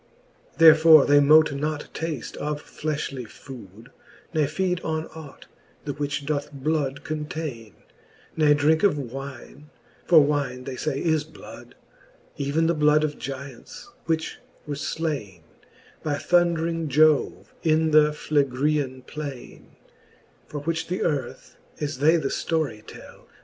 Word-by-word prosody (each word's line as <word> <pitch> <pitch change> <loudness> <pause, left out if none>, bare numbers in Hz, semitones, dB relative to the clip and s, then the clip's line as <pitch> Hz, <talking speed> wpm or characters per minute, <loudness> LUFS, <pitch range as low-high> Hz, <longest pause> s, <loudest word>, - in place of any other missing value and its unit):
X. - - -30
Therefore 160 -1 +8
they 145 0 +5
mote 150 +1 +5
not 150 +1 -3
tafte 160 -7 -5
of 150 0 -3
flefhly 145 -5 -4
food, 115 -3 -13 0.4
Ne 155 -3 +2
feed 180 +4 -1
on 160 0 -2
ought, 155 -3 -11 0.4
the 145 - -3
which 145 0 -3
doth 150 0 -2
bloud 140 -1 -2
containe, 150 -7 -5 0.6
Ne 150 -2 +4
drinke 155 +2 +2
of 200 -7 +3
wine, 135 +2 -8 0.4
for 165 - +7
wine, 140 -3 -1
they 130 0 -6
fay, 140 +1 -2
is 160 -3 +1
blood, 160 0 -13 0.6
Even 145 +3 0
the 170 - +2
bloud 150 -1 +3
of 150 -1 -3
Gyants, 135 -2 -8 0.2
which 160 -1 -2 0.3
were 150 - -4
flaine 140 - -4 0.6
By 150 -2 -1
thundring 170 0 +1
Jove 150 +1 +2
in 160 0 +2
the 150 0 +5
Phlegrean 140 -2 0
plaine. 145 -4 -9 0.7
For 145 - -6
which 165 +2 -2
the 180 +2 -2
earth, 140 -5 -3 0.2
as 145 -3 -4
they 160 +4 +5
the 140 -4 -2
ftory 145 -10 -2
tell. - - -13
150 Hz, 135 wpm, -24 LUFS, 140-155 Hz, 0.7 s, Therefore